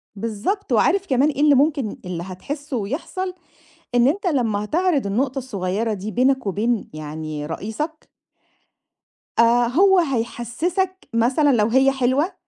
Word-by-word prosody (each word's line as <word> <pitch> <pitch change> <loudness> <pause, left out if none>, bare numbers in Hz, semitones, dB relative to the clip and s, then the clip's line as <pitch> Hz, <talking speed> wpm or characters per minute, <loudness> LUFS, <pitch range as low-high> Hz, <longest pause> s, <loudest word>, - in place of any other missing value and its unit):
بالضبط، 230 - -3
وعارف 390 +1 +3
كمان 270 +3 +3
إيه 285 -1 -2
اللي 295 -1 +6
ممكن 275 -5 +1
اللي 175 -1 -4
هتحسُّه 280 - -5
ويحصَل؟ 340 - -4 0.6
إن 245 +2 +5
أنت 390 +6 -1
لمّا 230 - 0
هتعرض 320 - +1
النقطة 255 +7 -1
الصغيرة 215 -3 -2
دي 205 +2 -5
بينك 260 0 +1
وبين 215 +4 -1
يعني 155 0 -5
رئيسك 225 - -5 1.3
آآ، 235 +1 +5
هو 375 +9 +4
هيحسسك 310 - -2
مثلًا 255 +6 +3
لو 215 -3 +3
هي 265 +3 +4
حلوة 270 +6 +1
255 Hz, 130 wpm, -22 LUFS, 215-300 Hz, 1.3 s, اللي